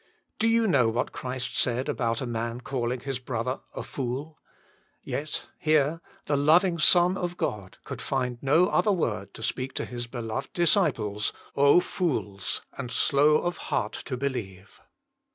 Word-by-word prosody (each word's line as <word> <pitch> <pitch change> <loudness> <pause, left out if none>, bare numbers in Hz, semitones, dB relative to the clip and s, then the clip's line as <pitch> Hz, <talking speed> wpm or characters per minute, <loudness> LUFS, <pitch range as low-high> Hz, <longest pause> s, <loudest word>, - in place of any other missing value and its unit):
" - - -49
Do 225 - +3
you 230 0 +3
know 140 - +4
what 120 +2 -1
Christ 125 0 -4
said 125 +2 +1
about 115 -6 -1
a - - -2
man 115 0 -3
calling 125 -1 -2
his 135 -1 -3
brother 125 0 -3 0.2
a - - -4
fool? 140 +4 -4 0.6
Yet 150 +1 -4
here 155 +1 +2 0.2
the 145 - +1
loving 170 +5 +4
Son 175 +3 +5
of 180 -2 -3
God 100 -3 -3
could - - -7
find 125 -3 -2
no 150 +6 +4
other 185 +4 +3
word 105 - -1
to 110 - -8
speak 130 +3 -2
to - - -2
His 120 -1 -5
beloved 120 +2 -5
disciples: 115 - +1
<* - - -26
OhI 140 +5 +6
fools, 105 - -2
and 130 -3 -5
slow 145 +4 +4
of 175 0 -1
heart - - 0
to 130 - -3
believe. 105 -8 -5
130 Hz, 165 wpm, -27 LUFS, 120-155 Hz, 0.6 s, OhI